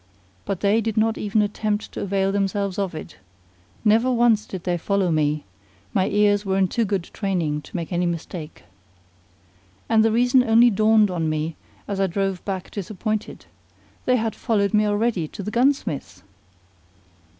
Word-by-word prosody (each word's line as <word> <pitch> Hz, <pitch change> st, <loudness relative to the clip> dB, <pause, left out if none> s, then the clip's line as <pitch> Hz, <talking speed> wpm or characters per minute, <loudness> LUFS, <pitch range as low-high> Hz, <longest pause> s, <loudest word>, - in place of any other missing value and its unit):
But 195 Hz, -3 st, -3 dB
they 210 Hz, +3 st, +3 dB
did 220 Hz, -1 st, -3 dB
not 220 Hz, +1 st, +2 dB
even 210 Hz, +1 st, +1 dB
attempt 210 Hz, 0 st, -2 dB
to -, -, -6 dB
avail 195 Hz, 0 st, 0 dB
themselves 200 Hz, -1 st, -1 dB
of 190 Hz, -4 st, -2 dB
it: 155 Hz, -, -8 dB, 0.7 s
never 225 Hz, +4 st, +4 dB
once 235 Hz, -3 st, +3 dB
did 185 Hz, -3 st, -7 dB
they 180 Hz, -1 st, 0 dB
follow 195 Hz, 0 st, 0 dB
me: 150 Hz, -1 st, +1 dB, 0.5 s
my 190 Hz, -, +2 dB
ears 205 Hz, 0 st, +3 dB
were 190 Hz, -1 st, 0 dB
in 190 Hz, -1 st, +3 dB
too 230 Hz, +4 st, 0 dB
good 195 Hz, -3 st, -1 dB
training 170 Hz, -7 st, -1 dB
to -, -, -14 dB
make 170 Hz, 0 st, -4 dB
any 175 Hz, 0 st, +1 dB
mistake. 165 Hz, -, -6 dB, 1.2 s
And 220 Hz, -1 st, +4 dB
the 225 Hz, -, +3 dB
reason 245 Hz, +3 st, +4 dB
only 235 Hz, +1 st, +5 dB
dawned 215 Hz, 0 st, +4 dB
on 165 Hz, -3 st, -1 dB
me 155 Hz, +1 st, -2 dB, 0.3 s
as 200 Hz, -1 st, -3 dB
I 195 Hz, -, +3 dB
drove 195 Hz, 0 st, -2 dB
back 190 Hz, -2 st, -4 dB
disappointed: 215 Hz, +2 st, -4 dB, 0.6 s
they 255 Hz, -, +3 dB
had 225 Hz, -2 st, -1 dB
followed 210 Hz, -3 st, 0 dB
me 210 Hz, 0 st, +3 dB
already 205 Hz, -5 st, 0 dB
to 200 Hz, -, -8 dB
the 210 Hz, -, -4 dB
gunsmith's! 235 Hz, -, 0 dB
200 Hz, 165 wpm, -23 LUFS, 180-220 Hz, 1.2 s, only